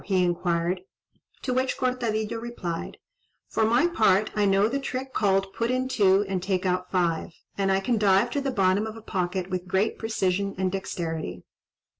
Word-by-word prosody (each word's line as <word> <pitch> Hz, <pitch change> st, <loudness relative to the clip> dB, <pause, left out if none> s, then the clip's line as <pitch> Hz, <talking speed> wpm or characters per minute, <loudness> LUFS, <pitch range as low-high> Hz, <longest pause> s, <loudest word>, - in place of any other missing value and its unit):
he 185 Hz, -2 st, +2 dB
inquired; 175 Hz, 0 st, 0 dB, 0.6 s
to 255 Hz, -, -1 dB
which 255 Hz, +1 st, 0 dB
Cortadillo 230 Hz, -3 st, -1 dB
replied, 185 Hz, -8 st, -5 dB, 0.5 s
"For -, -, 0 dB
my 235 Hz, +7 st, +4 dB
part 215 Hz, -, +3 dB
I 210 Hz, -1 st, +2 dB
know 195 Hz, +1 st, +4 dB
the 275 Hz, +5 st, -1 dB
trick 265 Hz, -1 st, -4 dB
called 195 Hz, -1 st, +1 dB
'put 230 Hz, +3 st, -1 dB
in 255 Hz, +1 st, 0 dB
two, 200 Hz, -5 st, +4 dB
and 190 Hz, -2 st, -2 dB
take 190 Hz, 0 st, -1 dB
out 180 Hz, 0 st, 0 dB
five,' 170 Hz, -2 st, 0 dB, 0.2 s
and 195 Hz, -1 st, +1 dB
I 190 Hz, 0 st, +2 dB
can 230 Hz, +2 st, +1 dB
dive 195 Hz, -2 st, +4 dB
to 285 Hz, -, -1 dB
the 275 Hz, -, -1 dB
bottom 200 Hz, -2 st, +2 dB
of 220 Hz, 0 st, -7 dB
a -, -, -10 dB
pocket 185 Hz, -2 st, -2 dB
with 185 Hz, 0 st, -3 dB
great 190 Hz, +4 st, 0 dB
precision 200 Hz, -3 st, -1 dB
and 185 Hz, 0 st, 0 dB
dexterity." 165 Hz, -, -4 dB
195 Hz, 180 wpm, -26 LUFS, 185-230 Hz, 0.6 s, my